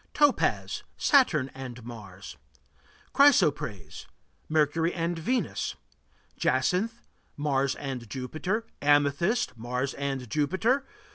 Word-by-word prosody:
Topaz 290 -3 +2 0.2
Saturn 165 - +3
and 125 -3 -8
Mars. 105 -5 -9 0.8
Chrysoprase 145 - +2 0.4
Mercury 155 +2 +2
and 170 0 -1
Venus. 230 - -1 0.6
Jacinth 180 - 0 0.4
Mars 140 -2 +1
and 130 -5 -6
Jupiter. 155 - -3 0.2
Amethyst 145 - +2
Mars 125 +3 -2
and 135 -3 -3
Jupiter. 190 - +1
145 Hz, 85 wpm, -28 LUFS, 130-185 Hz, 0.8 s, Saturn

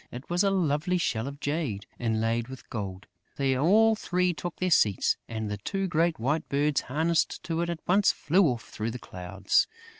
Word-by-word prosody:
It 125 +7 -9
was 175 +3 +2
a 200 - +3
lovely 180 -1 +1
shell 115 -8 -1
of 140 0 -7
jade, 145 -10 -2
inlaid 115 0 0
with 130 -1 -10
gold. 95 -4 -5 0.3
They 135 -1 +1
all 215 +11 +4
three 180 -3 0
took 175 +1 -5
their 185 0 -1
seats; 105 - +3
and 110 -2 -3
the 105 - -3
two 195 - -2
great 170 -2 +1
white 145 +7 -1
birds 145 +1 +1
harnessed 160 +5 0
to 165 0 -2
it 170 - -1
at 170 -2 -6
once 195 +3 +4
flew 180 +3 +3
off 120 -4 -2
through 110 +1 -4
the 120 - -5
clouds. 95 -2 0
145 Hz, 190 wpm, -28 LUFS, 115-175 Hz, 0.3 s, all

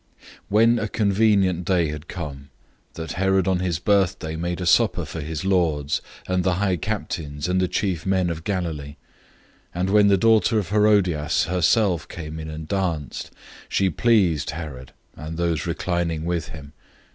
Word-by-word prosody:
006:021 105 - +3
Then 115 +1 +5
a 105 - -2
convenient 100 -4 +2
day 85 -5 +1
came, 70 -5 -7 0.5
that 80 0 -6
Herod 95 0 +1
on 95 -2 +2
his 90 -3 -1
birthday 90 -3 +1
made 85 +2 -3
a 90 - -3
supper 85 - +3
for 80 - -6
his 80 +2 -4
nobles, 80 -7 +1 0.3
the 90 0 +1
high 95 -2 0
officers, 80 -8 -3
and 90 +1 +1
the 90 - +2
chief 90 -2 -2
men 95 -2 +1
of 80 -1 -6
Galilee. 80 -7 -3 0.8
006:022 90 +2 -1
When 105 0 +5
the 100 -1 +5
daughter 110 +2 +3
of 100 -5 -1
Herodias 100 -7 +2
herself 90 +1 +2
came 80 -2 -7
in 80 0 -6
and 80 0 -7
danced, 85 -8 -2 0.4
she 95 -1 +1
pleased 95 -7 +2
Herod 75 -6 -7 0.2
and 80 +2 -7
those 85 -3 0
sitting 85 -3 -2
with 85 -2 -2
him. 70 -2 -11
90 Hz, 155 wpm, -23 LUFS, 80-95 Hz, 0.8 s, Then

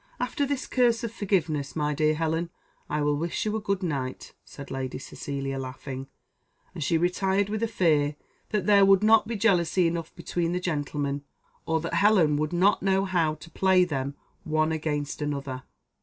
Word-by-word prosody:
"After 265 +3 -1
this 280 -2 -2
curse 240 -2 +2
of 230 - -3
forgiveness, 170 -10 -1
my 150 -1 0
dear 155 +1 +2
Helen, 165 +1 -1 0.4
I 150 0 0
will 145 0 +2
wish 165 +7 -2
you 215 0 -1
a 220 - -2
good 200 -2 -1
night," 135 -6 -3
said 140 -1 -11
Lady 130 -1 -3
Cecilia, 135 0 -5
laughing; 130 +1 -6 0.7
and 165 -4 -4
she 165 - +2
retired 190 +3 +1
with 215 +1 -2
a 230 - +1
fear 155 -8 +2 0.3
that 210 -4 -1
there 200 -1 +6
would 195 0 +5
not 220 0 +5
be 230 - -3
jealousy 185 -4 +2
enough 165 -1 -2
between 170 0 -2
the 180 - 0
gentlemen, 145 -4 -2 0.4
or 160 0 +1
that 165 +1 -4
Helen 170 -4 +4
would 155 0 -1
not 185 +4 +3
know 195 0 +2
how 170 -5 +1
to 165 +2 -14
play 190 +2 +4
them 140 -4 -3 0.3
one 155 -1 +1
against 150 -2 -2
another. 140 -3 -3
165 Hz, 180 wpm, -27 LUFS, 145-195 Hz, 0.7 s, there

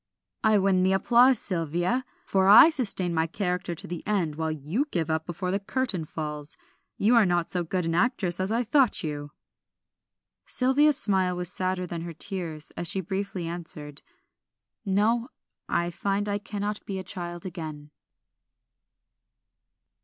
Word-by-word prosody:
"I 220 -1 +5
win 190 -2 +3
the 190 +1 +3
applause, 240 +6 +5
Sylvia; 175 - -1 0.2
for 190 -1 +2
I 225 +11 +9
sustain 200 - -1
my 160 0 +1
character 180 -1 -2
to - - -8
the 175 0 -5
end, 185 -7 0
while 160 +1 -2
you 155 - -2
give 165 - -1
up 160 0 -1
before 180 +1 -3
the 195 - 0
curtain 205 -5 -2
falls. 150 -1 -6 0.4
You 220 +4 +3
are 230 -3 +6
not 175 -1 0
so 180 -1 0
good 180 +1 -2
an 165 - -1
actress 180 -3 0
as 190 +2 -1
I 235 +2 +1
thought 255 0 +2
you." 145 -2 -4 1.2
Sylvia's 275 +3 +4
smile 190 -5 +2
was 180 +1 0
sadder 185 -1 -1
than 170 -1 -5
her 170 0 -6
tears 165 -3 -4
as 170 - -3
she 190 - -1
briefly 190 -1 -3
answered 160 -4 -7 0.8
"No, 225 +5 +1 0.4
I 175 0 0
find 200 +3 -1
I 205 0 -1
cannot 205 0 -4
be 195 - -3
a 190 - -4
child 175 -1 -6
again." 155 -5 -7
185 Hz, 155 wpm, -27 LUFS, 165-205 Hz, 1.2 s, I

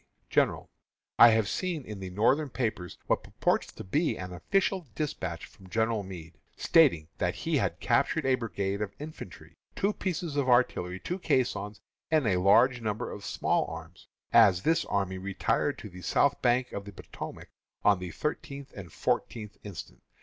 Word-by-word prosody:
_: - - -44
GENERAL: - - +1 0.5
I - - +11
have 110 -2 +3
seen 175 -7 -2
in 105 -2 -7
the 95 -1 -6
Northern 130 +10 +2
papers 110 -9 -3
what - - +1
purports - - 0
to - - -8
be 150 - 0
an 90 -1 -6
official 185 - 0
despatch 95 - -3
from 95 -2 -17
General 110 +1 +1
Meade, 85 -5 -10 0.2
stating 140 - +4
that - - 0
he - - 0
had - - -1
captured - - +1
a 135 - +4
brigade 100 -5 -2
of 100 -1 -4
infantry, 90 - -10 0.2
two 200 +2 +1
pieces 170 -6 -3
of 135 -2 +1
artillery, 95 -7 +2
two 180 - -4
caissons, 105 - 0 0.3
and 155 -4 +3
a 95 -5 +2
large 120 +7 +5
number 110 +1 -3
of 100 - -8
small - - 0
arms, 80 +1 -10 0.3
as 100 -6 +6
this 165 +1 +2
army 95 -2 -1
retired 100 +8 0
to - - -8
the 90 -2 -11
south 140 +8 +2
bank 125 0 +2
of 100 - -5
the 100 - -8
Potomac 95 - -9 0.4
on 100 -3 +5
the 90 -1 -5
thirteenth 140 - -5
and 95 -5 -9
fourteenth 105 +4 -2
instant. 100 -5 -9
105 Hz, 170 wpm, -29 LUFS, 95-140 Hz, 0.5 s, I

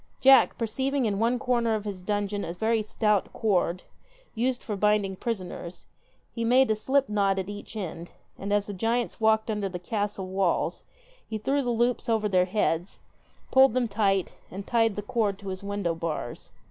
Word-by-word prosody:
Jack, 270 0 +6
perceiving 265 +4 -1
in 200 -2 0
one 235 +3 +2
corner 235 -2 +1
of 215 -1 -4
his 195 -3 -5
dungeon 205 +1 -2
a 170 - -4
very 220 +5 +1
stout 210 -1 0
cord, 185 -4 0 0.5
used 245 +2 -1
for 210 - -3
binding 205 -1 +2
prisoners, 185 -5 -5 0.5
he 230 - -3
made 250 +1 +4
a - - +3
slip 270 +5 +1
knot 200 -2 +1
at 190 +1 -3
each 205 +2 -9
end, 175 -4 -5 0.3
and 200 +1 -5
as 205 -1 +2
the 205 - -6
giants 230 +5 -1
walked 220 0 +3
under 205 -2 -2
the 180 - -5
castle 205 +1 -3
walls 190 -1 0 0.4
he 220 - -2
threw 275 +7 0
the 245 - -2
loops 240 +1 0
over 220 -2 +2
their 185 -3 +3
heads, 180 -2 -1 0.5
pulled 265 -2 +6
them 250 -2 +2
tight, 195 -3 +1 0.2
and 195 +2 -7
tied 225 -3 +2
the 205 - -4
cord 210 -2 0
to 200 -1 -8
his 185 +1 -5
window 200 -4 -1
bars. 165 -7 -5
210 Hz, 185 wpm, -27 LUFS, 195-230 Hz, 0.5 s, Jack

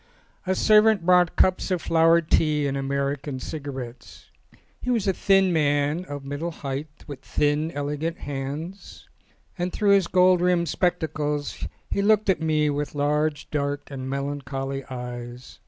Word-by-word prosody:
A 190 - +1
servant 215 -3 +4
brought 180 -1 +4
cups 185 +1 +2
of 185 -2 0
flowered 165 0 +3
tea 150 -2 +3
and 140 -1 -1
American 140 0 -2
cigarettes. 130 -5 -8 0.5
He 250 - -4
was 230 -5 +1
a 190 - +3
thin 195 -1 +3
man, 145 +2 +1
of 145 -4 -7
the - - -11
middle 145 +4 -3
height, 145 -1 -6
with 140 -3 -9
thin, 150 +2 0
elegant 145 +3 -3
hands; 145 +7 -6 0.5
and 180 +1 -1
through 205 +1 +2
his 195 -3 +4
gold 180 -1 +4
rimmed 175 -2 +2
spectacles 150 -4 -1 0.2
he 200 - +1
looked 210 -1 +3
at 175 - -2
me 155 -1 +2
with 145 +1 -3
large, 150 +1 0
dark, 145 -1 -2
and 130 -1 -5
melancholy 135 -1 -3
eyes. 125 -1 -8
150 Hz, 150 wpm, -24 LUFS, 140-175 Hz, 0.5 s, servant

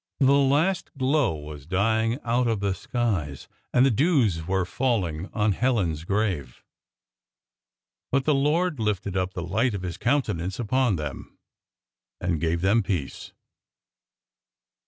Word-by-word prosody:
The 135 -1 +5
last 145 +7 +2
glow 130 - +2
was 75 -1 -9
dying 110 +5 +1
out 120 +1 +1
of 115 -3 0
the 100 -1 0
skies, 95 - -2 0.2
and 125 +1 +4
the 135 - +4
dews 115 - +2
were 95 -1 +1
falling 95 -7 -1
on 105 0 +1
Helen's 95 - 0
grave. 95 - -2 1.5
But 135 0 +1
the 155 - +3
Lord 150 +3 +1
lifted 100 -3 -1
up 95 0 -1
the 90 - -3
light 110 +7 0
of 95 - -5
His 90 -2 -4
countenance 95 - 0
upon 120 -1 +1
them, 75 -4 -7 0.8
and 85 -4 -1
gave 85 0 0
them 100 +5 +3
peace. 90 -9 -4
105 Hz, 135 wpm, -25 LUFS, 90-130 Hz, 1.5 s, The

